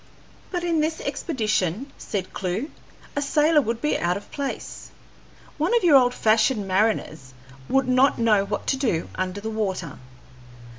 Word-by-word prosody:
"But 355 Hz, -2 st, -3 dB
in 335 Hz, -2 st, +1 dB
this 315 Hz, +1 st, 0 dB
expedition," 220 Hz, -, -2 dB
said 190 Hz, -3 st, -5 dB
Clewe, 195 Hz, -, -3 dB, 0.4 s
"a 285 Hz, -, 0 dB
sailor 300 Hz, +2 st, +3 dB
would 230 Hz, -2 st, -3 dB
be 300 Hz, -, +1 dB
out 175 Hz, +2 st, 0 dB
of 200 Hz, -, -12 dB
place. 280 Hz, -2 st, -5 dB, 0.7 s
One 355 Hz, +10 st, +3 dB
of 460 Hz, -, -1 dB
your 330 Hz, -5 st, +6 dB
old 250 Hz, -2 st, +5 dB
fashioned 220 Hz, -1 st, +2 dB
mariners 185 Hz, -9 st, -1 dB, 0.3 s
would 270 Hz, -1 st, +2 dB
not 255 Hz, +2 st, +4 dB
know 215 Hz, -4 st, +3 dB
what 205 Hz, +1 st, -4 dB
to 270 Hz, -, 0 dB
do 225 Hz, -, -1 dB
under 185 Hz, +1 st, -3 dB
the 220 Hz, +1 st, -4 dB
water. 190 Hz, -8 st, -3 dB
230 Hz, 155 wpm, -24 LUFS, 195-285 Hz, 0.7 s, your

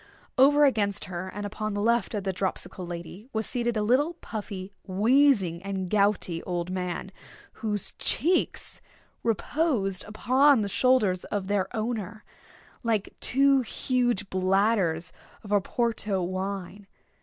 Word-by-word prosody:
Over 290 Hz, +3 st, +6 dB
against 205 Hz, -7 st, +1 dB
her, 185 Hz, 0 st, -5 dB
and 205 Hz, +1 st, -5 dB
upon 215 Hz, 0 st, -4 dB
the -, -, -1 dB
left 235 Hz, +1 st, +1 dB
of 205 Hz, -, -2 dB
the 190 Hz, -1 st, -1 dB
dropsical 185 Hz, -1 st, -4 dB
lady, 175 Hz, +5 st, -8 dB
was 220 Hz, 0 st, -1 dB
seated 240 Hz, -2 st, -1 dB
a 210 Hz, -, +1 dB
little 280 Hz, +10 st, +2 dB
puffy, 200 Hz, -, -7 dB
wheezing, 205 Hz, -, +3 dB
and 190 Hz, -2 st, -4 dB
gouty 200 Hz, -5 st, +1 dB
old 175 Hz, 0 st, -3 dB
man, 180 Hz, 0 st, -3 dB, 0.5 s
whose 210 Hz, -2 st, -1 dB
cheeks 350 Hz, +4 st, 0 dB, 0.4 s
reposed 230 Hz, -, 0 dB
upon 255 Hz, +5 st, +4 dB
the 200 Hz, -, -2 dB
shoulders 210 Hz, -6 st, +2 dB
of 200 Hz, -2 st, -3 dB
their 200 Hz, -1 st, 0 dB
owner, 215 Hz, -2 st, -3 dB, 0.6 s
like 225 Hz, -4 st, -1 dB
two 275 Hz, +1 st, +4 dB
huge 245 Hz, -4 st, 0 dB
bladders 185 Hz, -2 st, +1 dB, 0.3 s
of 205 Hz, -, -9 dB
Oporto 205 Hz, -1 st, 0 dB
wine. 195 Hz, +1 st, -5 dB
205 Hz, 130 wpm, -27 LUFS, 190-235 Hz, 0.6 s, Over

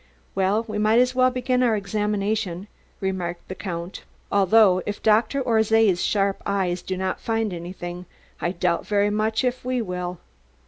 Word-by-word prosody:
"Well, 195 Hz, +4 st, +1 dB
we 210 Hz, -1 st, -3 dB
might 215 Hz, +2 st, +3 dB
as 250 Hz, +1 st, +4 dB
well 255 Hz, 0 st, +4 dB
begin 255 Hz, 0 st, 0 dB
our 235 Hz, -3 st, +3 dB
examination," 205 Hz, -2 st, -2 dB, 0.3 s
remarked 185 Hz, -3 st, -3 dB
the -, -, -3 dB
Count. 175 Hz, -1 st, -6 dB, 0.3 s
"Although 200 Hz, -1 st, +5 dB
if 205 Hz, -, -4 dB
Dr. 225 Hz, +5 st, +3 dB
Orszay's 220 Hz, -5 st, +3 dB
sharp 200 Hz, -1 st, +1 dB
eyes 185 Hz, -3 st, -1 dB
did 185 Hz, -, -4 dB
not 190 Hz, 0 st, -2 dB
find 225 Hz, -3 st, -1 dB
anything, 175 Hz, +1 st, -7 dB, 0.3 s
I 175 Hz, -, 0 dB
doubt 175 Hz, -1 st, -1 dB
very 205 Hz, 0 st, +2 dB
much 215 Hz, +3 st, 0 dB
if 250 Hz, 0 st, -1 dB
we 255 Hz, 0 st, -1 dB
will. 180 Hz, -4 st, -4 dB
205 Hz, 155 wpm, -24 LUFS, 185-225 Hz, 0.3 s, Although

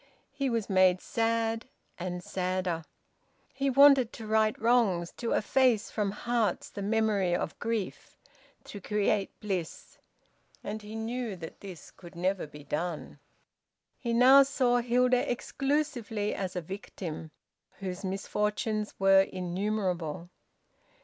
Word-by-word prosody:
He 275 Hz, -1 st, -1 dB
was 230 Hz, -4 st, -1 dB
made 185 Hz, -1 st, +4 dB
sad, 225 Hz, +1 st, -1 dB, 0.3 s
and 180 Hz, 0 st, -4 dB
sadder. 185 Hz, -3 st, -2 dB, 0.7 s
He 275 Hz, +1 st, 0 dB
wanted 275 Hz, -2 st, +6 dB
to 225 Hz, -, -8 dB
right 215 Hz, 0 st, +2 dB
wrongs, 220 Hz, -7 st, +2 dB
to 235 Hz, -, -1 dB
efface 245 Hz, -2 st, +2 dB
from 210 Hz, -2 st, 0 dB
hearts 220 Hz, -1 st, -1 dB
the 200 Hz, -, -6 dB
memory 205 Hz, -3 st, +1 dB
of 165 Hz, -, -3 dB
grief, 230 Hz, -4 st, -4 dB, 0.5 s
to 205 Hz, -, -9 dB
create 210 Hz, 0 st, 0 dB
bliss; 185 Hz, -6 st, -4 dB, 0.6 s
and 215 Hz, +1 st, -5 dB
he 210 Hz, +1 st, -9 dB
knew 225 Hz, -1 st, -3 dB
that 165 Hz, -2 st, -9 dB
this 185 Hz, -6 st, -10 dB
could 175 Hz, -2 st, -14 dB
never 185 Hz, -1 st, -1 dB
be 150 Hz, 0 st, -12 dB
done. 155 Hz, +3 st, -4 dB, 0.8 s
He 235 Hz, -, -3 dB
now 255 Hz, +4 st, +8 dB
saw 260 Hz, -3 st, +2 dB
Hilda 250 Hz, +1 st, +2 dB
exclusively 245 Hz, -6 st, -1 dB
as 190 Hz, -2 st, -4 dB
a 180 Hz, -, -1 dB
victim, 165 Hz, -3 st, -7 dB, 0.5 s
whose 190 Hz, 0 st, -5 dB
misfortunes 210 Hz, +2 st, -2 dB
were 195 Hz, 0 st, +6 dB
innumerable. 180 Hz, -3 st, -2 dB
210 Hz, 125 wpm, -29 LUFS, 185-235 Hz, 0.8 s, now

